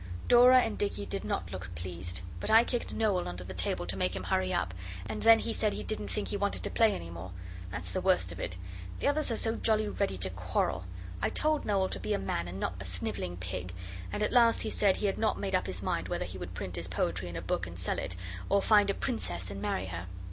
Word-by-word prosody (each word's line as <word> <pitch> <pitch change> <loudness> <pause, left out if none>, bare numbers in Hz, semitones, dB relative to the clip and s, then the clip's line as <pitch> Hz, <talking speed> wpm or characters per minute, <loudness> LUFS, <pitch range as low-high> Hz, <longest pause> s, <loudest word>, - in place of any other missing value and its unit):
Dora 250 +1 +8
and 225 - -2
Dicky 200 - -1
did - - -4
not - - -2
look 95 0 -6
pleased, 85 +1 -4 0.2
but - - -2
I 225 +1 +8
kicked 240 0 -2
Noel 205 -5 +1
under 90 0 -5
the 95 +1 -7
table 90 -1 0
to 90 +2 -1
make 90 -1 0
him 95 - -4
hurry 95 0 +1
up, 90 - 0 0.3
and 110 0 -4
then 225 0 +8
he 225 - -2
said 215 -2 +1
he - - -4
didn't 215 - -2
think 210 - -2
he 205 - -1
wanted 200 0 -1
to - - -2
play 225 -2 +4
any 85 0 -6
more. 85 +2 -7 0.4
That's 100 +3 -4
the 185 - -1
worst 180 - +2
of 85 - -8
it. 90 - -4 0.4
The - - 0
others 300 0 +2
are 230 - 0
so 225 0 +3
jolly 215 -1 +2
ready 200 - -1
to 95 +1 -1
quarrel. 90 0 -1 0.4
I - - +2
told 310 -1 +1
Noel 195 -2 +2
to - - -4
be 210 - -1
a - - +2
man 85 - -2
and 90 +2 -6
not 85 - -1
a - - -5
snivelling 90 -1 -3
pig, 90 0 -5 0.4
and 210 - -1
at - - 0
last 235 -2 +6
he - - -1
said 200 -2 +3
he - - -1
had 195 - 0
not 220 - +2
made 195 -1 -3
up 185 - +2
his 95 +1 -3
mind - - -1
whether - - -2
he 90 +1 -7
would 90 0 -7
print 90 0 -4
his 85 0 -2
poetry 90 0 -1
in 85 - -7
a 85 - -3
book 90 0 -1
and 85 +1 -9
sell 90 - -1
it, 90 - -3 0.3
or 200 - +5
find 205 -2 +5
a 200 - +1
princess 90 -3 -2
and 100 0 -6
marry 95 -2 -1
her. 85 -1 -5
95 Hz, 260 wpm, -31 LUFS, -, 0.4 s, Dora